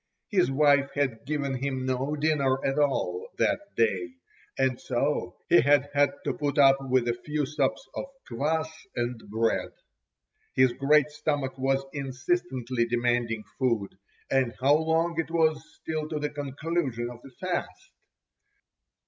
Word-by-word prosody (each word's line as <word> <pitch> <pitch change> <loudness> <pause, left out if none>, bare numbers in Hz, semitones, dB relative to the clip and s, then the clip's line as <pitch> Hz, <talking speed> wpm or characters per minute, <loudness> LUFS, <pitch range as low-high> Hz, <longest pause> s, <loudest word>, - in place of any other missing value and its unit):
His 120 - +3
wife 140 0 +4
had 135 -3 -1
given 145 -2 -1
him 130 -2 -2
no 130 +3 -1
dinner 145 -3 +1
at 135 +2 +1
all 425 - 0
that - - +2 0.2
day, 90 -6 +1 0.4
and 130 -2 +1
so - - -1
he - - +6
had 145 +1 +3
had 145 -1 +4
to - - -1
put 145 -1 -2
up 135 -1 +7
with 125 -1 +3
a 120 - +2
few 150 -1 -1
sups 145 - -1
of - - -4 0.2
kvass 155 +6 0 0.3
and 120 -1 -2
bread. 115 +2 0 0.9
His 130 -1 +4
great 150 +2 +3
stomach 145 -3 -2
was 135 +1 0
insistently 130 -3 -1
demanding 120 -2 0 0.2
food; 115 -7 0 0.4
and 130 -4 +2
how 135 +3 +4
long 160 +2 +1
it 160 -2 -1
was 160 -2 +2
still 155 -1 -4
to 155 - -2
the 150 0 -2
conclusion 140 -3 -2
of 120 -1 -12
the 135 - -12
fast! 185 - -4
135 Hz, 145 wpm, -27 LUFS, 125-150 Hz, 0.9 s, up